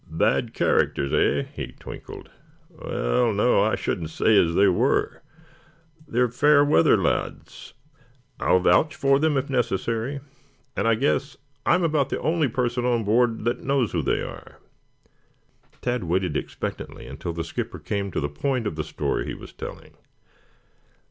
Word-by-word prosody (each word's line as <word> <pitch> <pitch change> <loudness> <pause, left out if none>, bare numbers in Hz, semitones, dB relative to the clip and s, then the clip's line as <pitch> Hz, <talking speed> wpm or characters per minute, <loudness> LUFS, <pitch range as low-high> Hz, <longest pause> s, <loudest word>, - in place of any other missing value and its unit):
"Bad 110 +7 0
characters, 70 - +1
eh?" - - +2
he - - -6
twinkled. - - -10 0.4
"Well, 110 - 0
no, 105 +1 +3
I 110 - +2
shouldn't 80 -4 -3
say 110 +6 +2
as 85 -4 +3
they 100 - +5
were. 90 - +1 0.9
They're 125 -2 +2
fair 145 +4 +4
weather 85 - +4
lads. - - -3 0.6
I'll 90 - +3
vouch 95 - +3
for 135 -2 +3
them 155 -1 +2
if 135 +1 -1
necessary, 120 +1 -1 0.6
and 100 - 0
I 115 - +4
guess 135 +2 0 0.3
I'm 180 - +4
about 155 -4 +1
the - - -2
only 160 -2 +1
person 120 0 -1
on 120 -2 +1
board 115 +1 +2
that 120 +2 -1
knows 135 -5 +1
who 85 - 0
they - - 0
are." - - -10 1.3
Tad 125 -5 -1
waited 90 -1 0
expectantly - - -5
until 85 - -6
the 85 0 -3
skipper 80 - -5
came 100 -1 -3
to - - -2
the 70 - -1
point 120 - -2
of 90 -7 -3
the 75 - -1
story - - -2
he - - -4
was - - -12
telling. - - -9
115 Hz, 155 wpm, -24 LUFS, 95-135 Hz, 1.3 s, they